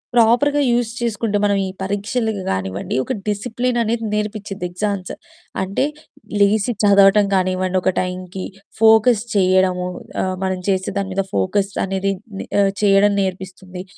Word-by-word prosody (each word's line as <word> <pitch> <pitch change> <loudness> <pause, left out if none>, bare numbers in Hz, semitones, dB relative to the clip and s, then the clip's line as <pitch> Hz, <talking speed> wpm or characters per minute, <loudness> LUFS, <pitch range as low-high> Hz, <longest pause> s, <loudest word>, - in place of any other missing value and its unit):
ప్రాపర్‌గా 245 +6 +4
యూస్ 240 -1 +1
చేసుకుంటే 225 -2 -1
మనం 200 -1 +2
ఈ - - -3 0.2
పరీక్షలకి 205 +2 -2
కానివ్వండి 95 0 -3
ఒక - - -3
డిసిప్లిన్ 240 +4 -1
అనేది 230 0 -1
నేర్పిచ్చిద్ది. 210 -3 -3
ఎగ్జామ్స్ 190 0 -3 0.5
అంటే 195 +8 0 0.5
లేచి 205 +3 +3
చదవటం 200 0 +6
కానివ్వండి, 185 0 0
ఒక 185 - +2
టైంకి 185 0 -5 0.4
ఫోకస్ 220 0 +5
చేయడము, 185 -1 +2 0.3
ఆహ్, 185 0 -1
మనం 190 -1 -1
చేసే 190 -1 0
దాని 195 -1 -2
మీద 195 +1 0
ఫోకస్ 195 - 0 0.2
అనేది 195 +1 -1 0.3
ని - - -5 0.2
ఆహ్, 195 -1 +3
చేయడం 200 0 +5
నేర్పిస్తుంది. 185 -1 -5
195 Hz, 135 wpm, -19 LUFS, 185-215 Hz, 0.5 s, చదవటం